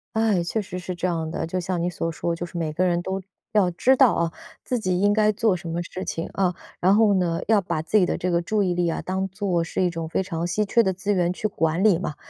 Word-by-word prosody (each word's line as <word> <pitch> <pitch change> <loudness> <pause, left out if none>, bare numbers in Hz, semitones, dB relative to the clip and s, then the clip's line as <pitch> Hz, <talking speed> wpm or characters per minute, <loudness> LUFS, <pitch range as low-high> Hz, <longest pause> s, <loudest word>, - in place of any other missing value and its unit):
哎， 220 -5 +2
确 195 +6 -2
实 185 -3 -5
是 180 0 -5
这 175 +1 -1
样 165 -2 -2
的， 160 - -3
就 185 +3 -2
像 180 0 -2
你 175 - 0
所 165 -1 -3
说， 170 +1 -2
就 170 - -5
是 175 0 -8
每 160 -2 -2
个 180 - +1
人 175 -2 +2
都 190 +1 -3 0.3
要 205 -4 +3
知 245 +10 +3
道 260 -4 +5
啊， 170 0 0 0.3
自 250 - -1
己 185 -4 0
应 205 +1 +3
该 215 0 +3
做 215 -1 +1
什 175 -1 -7
么 170 +1 -2
事 185 +2 -6
情， 165 - -3
啊， 185 -2 +1 0.2
然 190 +3 +4
后 215 -1 +5
呢， 175 -3 +1
要 215 -1 +4
把 160 -4 -2
自 175 - -4
己 190 -4 +5
的 - - -1
这 180 - -1
个 170 0 +2
注 210 +4 0
意 180 -2 +1
力 175 -1 +1
啊， 165 - -2
当 190 +1 -2
作 190 -3 -1
是 170 +2 -2
一 180 - +2
种 165 -1 -5
非 190 - 0
常 170 -2 -3
稀 210 +4 0
缺 235 +4 +3
的 190 -4 +1
资 195 +3 -1
源 175 -2 +1
去 200 +4 -2
管 165 -2 0
理 200 -6 +5
嘛， 150 -5 -4
180 Hz, 305 characters per minute, -24 LUFS, 170-200 Hz, 0.3 s, 道